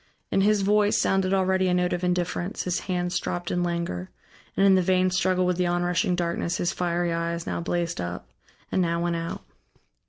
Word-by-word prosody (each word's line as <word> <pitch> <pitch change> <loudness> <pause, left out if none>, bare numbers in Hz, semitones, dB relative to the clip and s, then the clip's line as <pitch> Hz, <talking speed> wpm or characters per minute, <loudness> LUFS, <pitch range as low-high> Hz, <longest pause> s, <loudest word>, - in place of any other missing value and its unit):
In 195 - +3
his 205 0 +3
voice 210 +1 +3
sounded 190 -1 +1
already 190 -1 +2
a 180 - +2
note 180 0 +1
of 175 0 -3
indifference, 180 +1 -1
his 180 -1 -1
hands 180 -1 0
dropped 175 0 -4
in 175 - 0
languor, 170 - -2 0.5
and 195 - +4
in 195 - +6
the 190 - +4
vain 185 0 +2
struggle 185 0 +2
with 180 -1 +1
the 180 -1 +1
onrushing 175 +1 +1
darkness 170 0 -1
his 175 - 0
fiery 175 -1 0
eyes 170 0 -2
now - - -3
blazed 170 - -2
up, 85 -6 -5 0.4
and 185 - +2
now 170 -1 0
went 170 0 0
out. 165 0 -4
175 Hz, 195 wpm, -26 LUFS, 170-185 Hz, 0.5 s, in